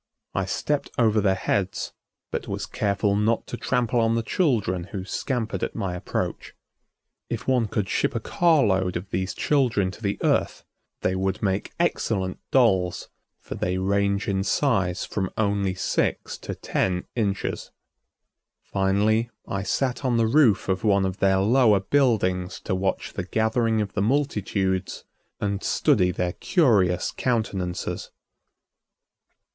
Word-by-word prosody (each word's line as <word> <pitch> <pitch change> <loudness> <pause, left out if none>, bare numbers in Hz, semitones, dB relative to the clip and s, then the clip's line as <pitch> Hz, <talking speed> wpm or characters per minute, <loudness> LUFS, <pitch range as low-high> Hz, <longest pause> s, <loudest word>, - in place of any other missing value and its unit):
I 95 - 0
stepped 145 +9 -1
over 110 -3 +3
their 95 -1 +3
heads 95 0 -1 0.4
but - - -3
was - - -3
careful 100 0 0
not 110 +3 +1
to - - -6
trample 120 -1 0
on 115 0 +2
the 115 - 0
children 110 - 0
who 95 0 -6
scampered 115 -3 -2
at - - -3
my 95 -2 -2
approach. 90 - -4 0.7
If - - -4
one 125 -4 +2
could 105 -1 -2
ship - - 0
a - - +1
car 165 -5 +3
load 95 -4 +1
of 95 +3 -9
these 95 +1 -2
children 120 -10 +1
to 105 - -13
the 100 -2 -1
Earth, - - +1 0.4
they 95 - +1
would 95 +3 -1
make 95 -1 -1
excellent 95 -1 0
dolls, 95 -9 +2 0.3
for - - -7
they 90 0 -1
range 100 +2 +1
in 95 -1 0
size 95 -8 +1
from 95 -3 -2
only 100 -3 0
six 90 - -1
to - - -6
ten 90 -1 -1
inches. 100 -4 -2 0.9
Finally, 105 +4 +1 0.2
I 100 - -2
sat 125 +8 -1
on 125 -3 +1
the 115 - +3
roof 115 -3 +4
of 95 -1 -1
one 100 -3 +3
of 95 0 -3
their 95 -1 +3
lower 110 -1 +4
buildings 95 -6 +1
to - - -3
watch 95 +1 -1
the 95 - -3
gathering 110 +1 +1
of 100 -2 -4
the 105 - -1
multitudes 100 -7 0 0.4
and 100 -1 -1
study 90 - +3
their 90 -1 -1
curious 100 - +2
countenances. 100 -8 -2
100 Hz, 145 wpm, -25 LUFS, 95-115 Hz, 0.9 s, roof